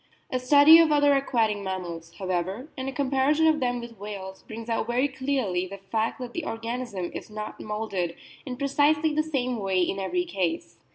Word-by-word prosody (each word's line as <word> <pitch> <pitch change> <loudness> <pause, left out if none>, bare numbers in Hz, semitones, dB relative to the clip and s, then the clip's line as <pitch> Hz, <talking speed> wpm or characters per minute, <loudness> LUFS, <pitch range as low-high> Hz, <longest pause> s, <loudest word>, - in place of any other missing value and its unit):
A 255 - 0
study 285 +5 +8
of 325 -2 +5
other 290 -1 +5
aquatic 230 -6 +1
mammals, 175 -4 -5
however, 190 - -3
and 260 0 -3
a - - -4
comparison 280 +3 +2
of 315 -1 +4
them 245 -1 0
with 235 -3 -10
whales, 195 -2 -7
brings 225 0 -9
out 230 - -1
very 245 +4 +2
clearly 260 -9 -1
the 200 +2 -8
fact 220 +3 -2
that 245 -1 -6
the 340 - -3
organism 230 - -4
is - - -7
not 215 0 -6
moulded 210 -5 -3 0.3
in 250 -3 -6
precisely 295 +3 +2
the 305 - +2
same 260 -6 -1
way 190 -2 0
in 190 +2 0
every 355 - -1
case. 180 - -3
235 Hz, 185 wpm, -26 LUFS, 195-280 Hz, 0.3 s, study